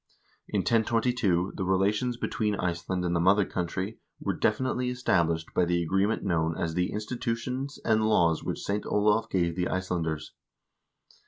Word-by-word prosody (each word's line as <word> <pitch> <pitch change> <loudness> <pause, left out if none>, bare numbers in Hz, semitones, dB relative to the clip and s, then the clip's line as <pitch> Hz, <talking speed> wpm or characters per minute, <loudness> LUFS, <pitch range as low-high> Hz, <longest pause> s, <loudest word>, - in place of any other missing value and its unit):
In - - 0
1022 115 -5 +1
the - - -2
relations 100 +6 +1
between 110 -3 -1
Iceland 90 0 -2
and 85 0 0
the - - +2
mother 95 +3 +4
country 90 +5 -3 0.2
were - - -1
definitely 125 -1 0
established 85 -10 0
by - - +3
the 85 0 +1
agreement 95 +6 +1
known 80 -3 0
as 85 -1 -2
the 90 +1 0
"Institutions 120 +5 -3
and 110 -1 +3
Laws 85 -6 +3
which - - -4
St. 100 +1 -1
Olav 105 +2 +2
gave 85 -3 0
the 90 0 0
Icelanders." 85 -4 -2
95 Hz, 150 wpm, -28 LUFS, 85-110 Hz, 0.2 s, mother